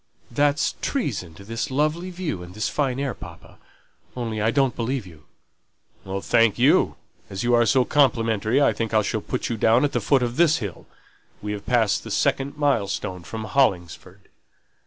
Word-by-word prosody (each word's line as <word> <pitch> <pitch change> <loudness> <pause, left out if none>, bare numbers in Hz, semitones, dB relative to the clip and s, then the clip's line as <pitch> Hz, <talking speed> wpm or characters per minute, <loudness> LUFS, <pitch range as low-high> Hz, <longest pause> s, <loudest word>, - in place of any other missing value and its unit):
"That's 145 +4 +1
treason 105 - -3
to 100 - -12
this 115 +3 -4
lovely 155 +6 0
view 175 - -4
and 90 +1 -11
this 110 - -1
fine 135 -4 0
pure 140 +1 -2
air, - - -3
papa. - - -13 0.6
Only 115 -3 -3
I 110 - +2
don't 135 -2 +1
believe 120 -1 -2
you." 80 -4 -15 1.0
"Thank 115 -2 +3
you. - - +3 0.3
As 95 +2 -4
you 120 0 +2
are 120 -1 +4
so 130 0 +3
complimentary, 115 -4 +2
I 140 - +4
think 115 -1 -3
I 110 - +4
shall 110 +1 -2
put 125 - -3
you 115 - -2
down 115 +5 +4
at 145 - -1
the 120 - -1
foot 130 +4 +2
of 120 0 -3
this 165 -2 +4
hill; 100 -7 -7 0.5
we've 105 -1 -6
passed 110 -4 +2
the 115 - -8
second 140 +5 0
mile 140 -9 +1
stone 95 -2 -4
from 110 +5 -7
Hollingford." 95 - -1
120 Hz, 180 wpm, -23 LUFS, 105-140 Hz, 1.0 s, are